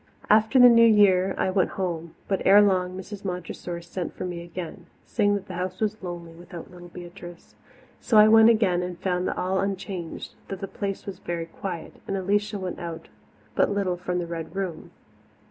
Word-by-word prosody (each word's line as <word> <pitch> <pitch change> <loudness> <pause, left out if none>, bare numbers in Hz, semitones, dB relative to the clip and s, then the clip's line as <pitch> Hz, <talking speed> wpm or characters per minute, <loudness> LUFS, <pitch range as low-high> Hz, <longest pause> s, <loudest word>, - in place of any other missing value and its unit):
After 220 +4 +5
the 250 -1 +10
New 230 -1 +7
Year 195 -3 +4
I 185 - +1
went 185 -1 0
home, 170 -3 -3
but 195 - 0
ere 200 +2 +7
long 185 -2 +1
Mrs. 200 +1 -8
Montressor 180 -2 -5
sent 175 0 -5
for - - -5
me 175 -1 -5
again, 175 +1 -8 0.2
saying 205 -3 +1
that 200 -1 -4
the 185 - -7
house 185 +1 -4
was 215 0 -1
lonely 175 -2 -7
without 175 0 -10
little 175 -1 -12
Beatrice. 175 0 -11 0.5
So 220 - +2
I 210 0 +9
went 225 +1 +7
again 200 -6 +3
and 180 -1 -5
found 180 -1 -1
all 190 +1 -1
unchanged, 190 -3 -4
though 195 - -4
the 195 +1 -6
Place 195 0 -4
was 190 -2 -7
very 170 -1 -4
quiet, 170 0 -7
and 195 - -1
Alicia 205 +2 0
went 185 -2 -5
out 170 -1 -7 0.4
but - - +2
little 200 -3 0
from 180 0 -3
the 175 - -2
Red 165 0 -6
Room. 185 -5 -4
185 Hz, 190 wpm, -25 LUFS, 175-200 Hz, 0.5 s, the